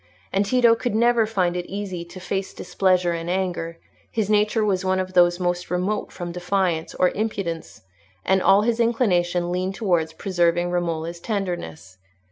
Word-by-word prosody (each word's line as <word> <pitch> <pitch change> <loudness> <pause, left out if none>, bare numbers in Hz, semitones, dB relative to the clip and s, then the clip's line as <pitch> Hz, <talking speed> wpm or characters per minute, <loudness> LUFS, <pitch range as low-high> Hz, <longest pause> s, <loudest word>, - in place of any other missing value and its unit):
And 195 +1 +1
Tito 240 0 +5
could 230 -1 -2
never 235 -1 +3
find 185 -5 0
it 180 0 -3
easy 190 -3 -5
to 175 +2 -11
face 190 +1 -4
displeasure 185 -2 +1
and 170 0 -4
anger; 175 -3 -2 0.3
his 215 -2 -1
nature 210 +1 +2
was 190 -2 0
one 185 0 +1
of 185 0 -3
those 175 0 +4
most 175 -1 -1
remote 185 +4 -1
from 175 -1 -6
defiance 180 -2 -1
or 180 - +3
impudence, 195 - -4 0.4
and 190 0 +3
all 195 +2 +5
his 235 +1 0
inclinations 180 -7 +2
leaned 180 +2 -2
towards 175 -7 0
preserving 175 -1 +1
Romola's 170 -1 -2
tenderness. 170 - -4
185 Hz, 160 wpm, -23 LUFS, 175-205 Hz, 0.4 s, Tito